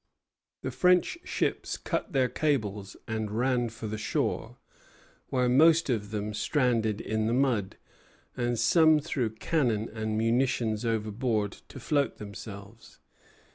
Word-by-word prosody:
The - - -2
French 180 - +3
ships - - -2
cut - - -3
their 130 -3 +2
cables 105 -11 -1
and 110 -2 -2
ran 120 +2 +1
for 115 0 -9
the 110 0 -4
shore, - - -2 0.7
where 125 -1 +1
most 155 +4 +5
of 105 -4 -2
them 105 0 -3
stranded 115 -4 +1
in 110 -1 -1
the 115 - +1
mud, 125 -8 +1 0.6
and 120 -1 -1
some 155 +6 +5
threw 140 -6 -1
cannon 110 -1 0
and 110 -1 -2
munitions 115 -1 +1
overboard 110 -1 -1 0.2
to 135 - -10
float 140 +2 0
themselves. 100 +1 -10
115 Hz, 130 wpm, -28 LUFS, 110-130 Hz, 0.7 s, most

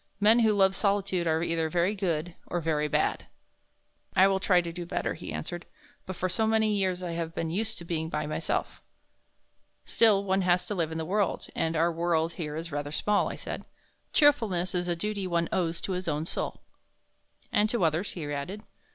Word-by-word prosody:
"Men 215 +3 +6
who 220 -2 +4
love 190 -1 +4
solitude 195 -4 +1
are 160 0 +2
either 165 -1 0
very 175 +4 +1
good 175 -4 -2
or 175 - -1
very 155 -2 0
bad." - - 0 0.9
"I 190 - +7
will 195 -1 +1
try 185 -1 +4
to 170 -1 -3
do 175 0 -5
better," 175 - -2
he 160 - -7
answered, 175 +1 -5 0.4
"but 185 - -4
for 185 - -1
so 220 +5 0
many 220 -1 +3
years 185 -2 0
I 175 - -3
have 165 -1 -4
been 165 -1 -2
used 220 +4 -2
to 170 - -9
being 160 -1 -2
by 150 -1 -2
myself." 155 +2 -2 1.0
"Still 210 -4 +4
one 190 0 +1
has 180 -1 +2
to - - -3
live 165 -5 -1
in 160 - -4
the 160 - -3
world 200 +3 0
and 165 0 0
our 165 +2 +3
world 165 -1 0
here 150 -3 -4
is 165 +1 -5
rather 145 0 -3
small," 205 +6 +1
I - - -5
said. - - -6 0.5
"Cheerfulness 225 - +3
is 180 -1 -1
a 175 - 0
duty 200 +2 -2
one 170 -1 +1
owes 170 -2 0
to - - -3
his 185 0 -3
own 155 0 -1
soul." - - -3 0.9
"And 210 +1 +3
to 230 -5 0
others," 165 +4 +1
he 165 -4 -5
added. 180 +9 -5
175 Hz, 205 wpm, -28 LUFS, 165-195 Hz, 1.0 s, I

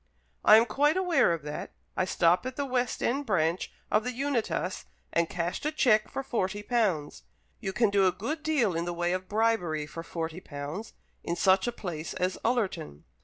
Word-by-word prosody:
"I 215 - +9
am 225 - +5
quite 290 +9 +2
aware 340 - +3
of 165 -3 -2
that. 150 0 -6 0.2
I 185 - +1
stopped 180 +4 +2
at 255 - -5
the 285 - -1
West 250 -2 -1
end 275 +3 0
branch 170 -3 +1 0.2
of 215 - +3
the 250 - -2
Unitas 235 - -2 0.3
and 170 -1 +2
cashed 175 0 -3
a 300 - 0
cheque 220 -8 +3
for 270 - -4
forty 205 -5 -2
pounds. 205 -11 0 0.4
You 195 -4 -3
can 220 +1 +2
do 195 -2 +4
a - - +4
good 295 - -4
deal 290 - +1
in 165 +1 -1
the 175 - -2
way 175 +1 0
of 185 0 -4
bribery 205 -8 +1
for 150 +2 -7
forty 165 0 -5
pounds, 150 +6 -7 0.3
in 170 - -2
such 190 +4 +3
a - - +1
place 170 -8 -5
as 185 +1 -1
Ullerton. 195 - -1
195 Hz, 195 wpm, -29 LUFS, 170-245 Hz, 0.4 s, I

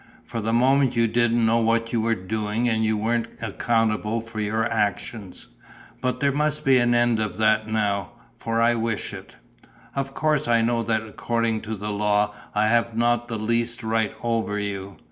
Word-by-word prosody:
For 115 - -4
the 110 +2 -1
moment 130 +2 +3
you 115 0 +3
didn't 120 0 +2
know 115 +1 +3
what 115 0 +1
you 115 - +2
were 115 +1 +1
doing 105 +4 -2
and 110 -1 +1
you 110 0 +1
weren't 115 +2 0
accountable 115 0 0
for 115 -1 -8
your 110 +1 0
actions. 105 -2 -3 0.5
But 125 0 -1
there 140 -1 +2
must 150 +2 -1
be 135 -1 +5
an 120 0 +3
end 120 -1 +3
of 105 -3 -2
that 110 0 +2
now, 100 -4 -1 0.2
for 115 0 -2
I 120 +1 +4
wish 115 -2 -2
it. - - -10 0.6
Of 135 0 -3
course 155 -3 +1
I 115 -1 +3
know 120 0 +1
that 110 -1 0
according 115 0 -1
to 110 - -2
the 105 +1 -4
law 105 0 +1 0.2
I 105 +1 +3
have 115 0 +1
not 120 0 +2
the 115 - -3
least 115 +2 -1
right 110 -1 0
over 115 -3 -1
you. 100 -1 -4
115 Hz, 185 wpm, -24 LUFS, 110-120 Hz, 0.6 s, be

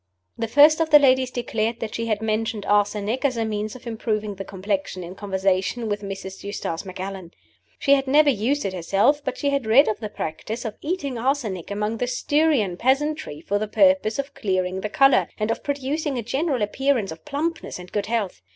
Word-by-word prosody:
The 230 - -2
first 295 +6 +6
of 320 - +1
the 300 - +9
ladies 260 -2 +4
declared 230 -2 -2
that 220 - -5
she 230 0 -3
had 215 -1 -1
mentioned 220 -1 -1
arsenic 205 +4 +1
as 260 -4 +1
a 225 - 0
means 215 0 -3
of 255 - -12
improving 215 -2 -2
the 195 0 -6
complexion 195 -1 -3
in 175 +1 -8
conversation 195 +3 -1
with 205 0 -2
Mrs. 195 -1 -7
Eustace 200 -4 -4
Macallan. 190 -1 -6 0.5
She 280 - +3
had 270 -1 +2
never 290 +2 +5
used 265 +6 0
it 195 - -2
herself, 195 - +2
but 260 -2 -3
she 285 - 0
had 275 -5 -1
read 250 +6 +6
of 215 - -1
the 215 -2 -5
practice 215 +7 -5
of 220 - -4
eating 290 -7 -3
arsenic 230 - -1
among 210 +2 -2
the 245 - -1
Styrian 255 - +1
peasantry 270 - 0
for 205 +4 -1
the 215 - -2
purpose 280 -2 +3
of 275 0 -4
clearing 190 -6 -1
the 210 - -3
color, 270 +4 +4
and 215 +1 0
of - - -3
producing 285 0 -2
a 235 - -2
general 265 +1 0
appearance 245 -2 0
of 160 - -10
plumpness 305 +3 -3
and 180 0 -11
good 205 -1 -2
health. 215 - -2
225 Hz, 200 wpm, -23 LUFS, 200-275 Hz, 0.5 s, the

